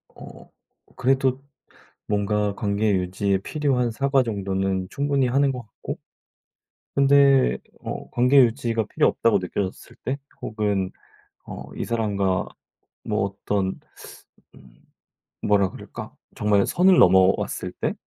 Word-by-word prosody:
어 - - -13 0.5
그래도 130 0 +1 0.7
뭔가 105 0 0
관계 105 +1 0
유지에 95 +2 0
필요한 125 0 0
사과 135 +3 +2
정도는 95 -3 -2
충분히 140 -2 0
하는 135 +2 +2
것 125 -1 -5
같고 105 - -8 1.0
근데 140 - +5 0.2
어 - - -6
관계 125 +3 +3
유지가 115 -2 0
필요 - - +2
없다고 110 -3 +2
느껴졌을 95 +1 -5
때? 135 +2 -2 0.2
혹은 100 -3 -1 0.6
어 - - -7
이 - - -3
사람과 100 -4 0 0.6
뭐 - - 0
어떤 100 -1 -2 0.8
음 65 -2 -18 0.7
뭐라 100 -2 +3
그럴까? - - -9 0.2
정말 105 -1 +2
선을 185 +1 +4
넘어왔을 95 +1 +3
때? - - 0
105 Hz, 230 characters per minute, -23 LUFS, 95-130 Hz, 1.0 s, 근데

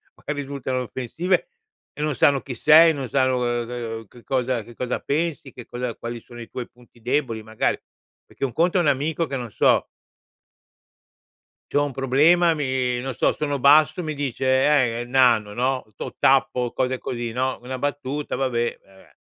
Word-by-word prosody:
magari 150 -1 -4
risultano 135 -2 -3
offensive 160 - -1 0.5
e - - -8
non 150 -2 0
sanno 140 +1 +4
chi 130 - -7
sei, 160 +5 +7
non 135 -4 -5
sanno, 130 0 +2
uhm, 120 -1 -1
uhm, 115 -2 -5
che 120 +4 -17
cosa 125 -3 -1
che 120 +2 -14
cosa 125 +1 -2
pensi, 150 -2 -2
che 120 - -10
cosa 120 -1 -4
quali 120 0 -6
sono 120 +1 -13
i 115 - -10
tuoi 125 -2 -6
punti 120 -1 -22
deboli, 125 -2 -1
magari. 110 0 -1 0.5
Perché - - -4
un 125 - -5
conto 175 +3 +2
è - - +4
un 165 - +1
amico 150 +4 0
che, 140 - -4
non 120 -3 -6
so - - +3 1.9
c'ho 145 - +3
un 145 - -4
problema 150 +7 +4
mi 130 -4 -1
non 130 +1 -4
so, - - +2
sono 145 -2 -2
basso, 150 +6 +5
mi 155 -2 -3
dice: 130 -2 +1
"Eh, - - -3
nano", 120 -5 +3
no, 130 +2 0
o - - -7
tappo 125 -2 +2
cose 130 0 -1
così, 120 -2 -4
no, 130 +2 -1
una 130 +1 -5
battuta, 145 +1 -3
vabbè, 120 -3 -1
vabbè, 95 0 -21
130 Hz, 175 wpm, -23 LUFS, 120-145 Hz, 1.9 s, sei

